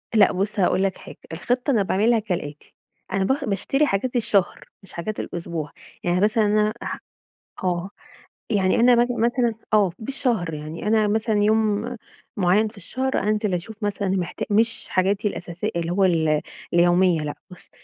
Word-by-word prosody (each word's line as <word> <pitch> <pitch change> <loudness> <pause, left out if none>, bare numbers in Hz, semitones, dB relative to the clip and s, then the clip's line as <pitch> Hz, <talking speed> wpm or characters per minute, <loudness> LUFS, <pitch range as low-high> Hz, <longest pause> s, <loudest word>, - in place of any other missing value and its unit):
لأ 205 -3 +6
بُصّ 200 +2 -2
هاقول 185 +1 +2
لك 195 -1 -1
حاجة، - - -12 0.2
الخطة 245 - -1
أنا 215 -5 +3
باعملها 220 +5 +2
كالآتي، 160 -8 -5 0.4
أنا 195 0 +1
ب - - 0 0.2
باشتري 270 +9 +1
حاجات 245 +6 -1
الشهر 205 -5 +1 0.2
مش 195 - -15
حاجات 210 +5 -4
الأسبوع، 165 -3 -5 0.3
يعني 175 +1 +1
مثلًا 215 +1 +3
أنا 210 +1 +2
ح - - -4 0.6
آه، 180 +1 -1 0.6
يعني 195 -4 +2
أنا 245 +1 +6
مث 240 +1 +3
مثلًا 240 0 +1 0.2
آه، 200 -4 +4
بالشهر 225 - -1
يعني، 155 +6 -6
أنا 215 -1 +3
مثلًا 215 0 +1
يوم 220 +2 +1 0.4
معيّن 200 +4 +3
في 215 0 -12
الشهر 260 +8 -2
أنزل 210 -1 0
أشوف 180 +5 -4
مثلًا 205 -1 -1
محتا 185 -2 -2
مش 225 +3 +1
حاجاتي 195 +3 +1
الأساسي 180 +3 -4
اللي 170 0 -1
هو 195 +2 +2
ال 160 -4 +2 0.3
اليومية، 175 -1 +4
لأ 150 -1 -4
بُصّ 180 - -13
205 Hz, 160 wpm, -23 LUFS, 180-220 Hz, 0.6 s, لأ